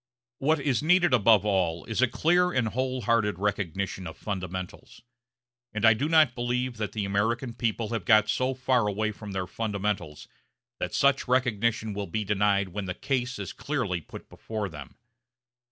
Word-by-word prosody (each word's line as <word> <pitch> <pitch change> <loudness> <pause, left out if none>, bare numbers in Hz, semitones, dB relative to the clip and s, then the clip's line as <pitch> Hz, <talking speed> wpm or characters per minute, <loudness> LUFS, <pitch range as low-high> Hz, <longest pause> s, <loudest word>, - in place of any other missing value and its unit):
What 155 +3 +2
is 140 -2 0
needed 175 -1 +4
above 110 -3 +5
all 90 -5 0
is 110 +2 -2
a 130 - +5
clear 175 +8 +2
and 125 -7 +1
wholehearted 115 -5 0
recognition 95 -2 -2
of 80 - -9
fundamentals. 95 -1 -6 0.7
And 110 +1 +1
I 110 - +8
do 140 +8 -2
not 155 -6 +5
believe 125 0 -2
that 110 -1 -3
the 105 -2 -2
American 115 +5 -1
people 115 -2 -2
have 115 -4 -2
got 110 +3 +5
so 130 +4 0
far 125 -3 +1
away 110 +1 -1
from 105 -1 -9
their 95 -1 -2
fundamentals 100 -6 -3 0.5
that - - -3
such 140 -1 +3
recognition 115 -3 +1
will 100 0 -4
be 110 +5 -2
denied 100 -1 +1
when 100 +2 -5
the 90 -1 -4
case 130 -1 -2
is - - -6
clearly 120 - -2
put - - -11
before 110 -3 -5
them. 75 -5 -10
110 Hz, 170 wpm, -27 LUFS, 100-125 Hz, 0.7 s, I